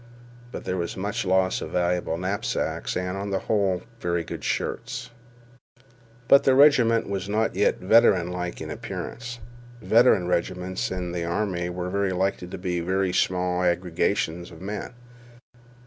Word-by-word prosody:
But - - -6
there 90 - -2
was 85 +1 -3
much 100 +1 -2
loss 95 0 +2
of - - -5
valuable 90 -2 0
knapsacks, 95 +3 -2
and, 90 0 -2
on 100 +1 -4
the 100 - 0
whole, 95 -3 0 0.2
very 85 -3 -1
good - - -7
shirts. 125 0 -3 1.2
But 140 - +7
the 135 - +4
regiment 125 -5 +5
was 100 -1 -3
not 110 +2 +1
yet 100 +2 +2
veteranlike 90 -4 +3
in - - -5
appearance. 120 -1 -6 0.4
Veteran 110 -6 +4
regiments 90 +1 -1
in 90 -2 -3
the 85 -1 -3
army 90 0 -1
were 90 +3 -1
likely 95 0 -1
to 90 - -7
be 90 -1 -2
very 95 +2 0
small 90 -1 +1
aggregations 85 -1 0
of 80 - -13
men. 105 +6 -6
95 Hz, 145 wpm, -25 LUFS, 90-100 Hz, 1.2 s, But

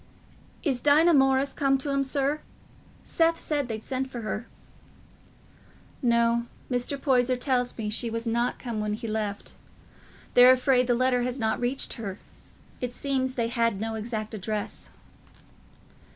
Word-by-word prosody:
"Is 265 -6 0
Dinah 310 +5 +5
Morris 270 -1 +3
come 275 -2 +2
to 280 +2 -3
'em, 275 0 +1
sir? 280 +2 0 0.6
Seth 330 0 +2
said 290 -4 -1
they'd 220 -2 -5
sent 265 0 -3
for 245 -2 -6
her." 215 +2 -4 1.5
"No. 235 -1 +2 0.2
Mr. 250 +3 -1
Poyser 255 -2 +2
tells 250 -1 0
me 220 -2 -3
she 230 +2 0
was 230 +1 -3
not 235 +2 0
come 235 -4 -4
when 210 0 -1
he 230 +1 -6
left. 215 -2 -3 0.8
They're 245 +1 +9
afraid 255 -1 +2
the 245 - +3
letter 250 0 +2
has 250 +1 -2
not 220 -3 0
reached 245 +3 -1
her. 200 -4 -5 0.6
It 245 -1 -3
seems 260 -2 -1
they 230 -2 0
had 230 -4 0
no 225 +1 -3
exact 220 0 -4
address." 210 0 -4
245 Hz, 150 wpm, -27 LUFS, 230-270 Hz, 1.5 s, They're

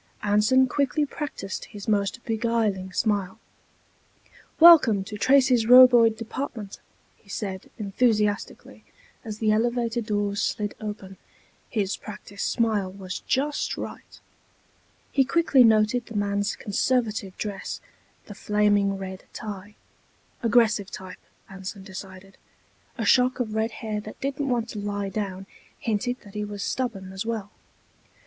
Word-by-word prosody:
Anson 210 +6 +4
quickly 285 +3 0
practiced 275 -10 -6
his 205 -2 -10
most 205 +3 0
beguiling 220 -4 -1
smile. 200 0 -1 1.2
"Welcome 290 - +8
to 210 - -8
Tracy's 255 0 +4
Roboid 245 -3 +8
Department," 230 -3 -6 0.4
he 200 - -25
said, 195 -2 -5
enthusiastically, 210 0 -1 0.4
as 215 -3 -6
the 215 -1 +1
elevator 235 +1 0
doors 205 -2 -1
slid 205 -1 -1
open. 205 -3 -7 0.5
His 205 -4 -1
practiced 205 -1 -6
smile 215 -5 0
was 185 -1 -6
just 285 +3 0
right. - - -8 0.9
He 275 - +4
quickly 275 -2 +4
noted 220 +2 +3
the 230 - -10
man's 205 +1 0
conservative 215 -2 -1
dress, 200 -3 -5 0.5
the 205 - -9
flaming 205 -1 +1
red 190 -1 -7
tie. 205 0 -7 0.7
Aggressive 220 -4 +3
type, 185 -1 -9 0.3
Anson 195 +1 -8
decided. 190 0 -10 0.6
A 225 - -2
shock 250 +4 +4
of 225 -4 -2
red 220 +1 0 0.2
hair 210 -1 -2
that 215 +1 -10
didn't 275 +1 -2
want 235 -2 0
to 215 - -6
lie 205 -1 -3
down 195 -1 -4 0.3
hinted 240 +3 -2
that 200 -2 -15
he 210 0 -3
was 205 -1 -5
stubborn 200 -7 -3
as 190 +2 -4
well. 220 -3 -4
215 Hz, 125 wpm, -25 LUFS, 200-235 Hz, 1.2 s, Welcome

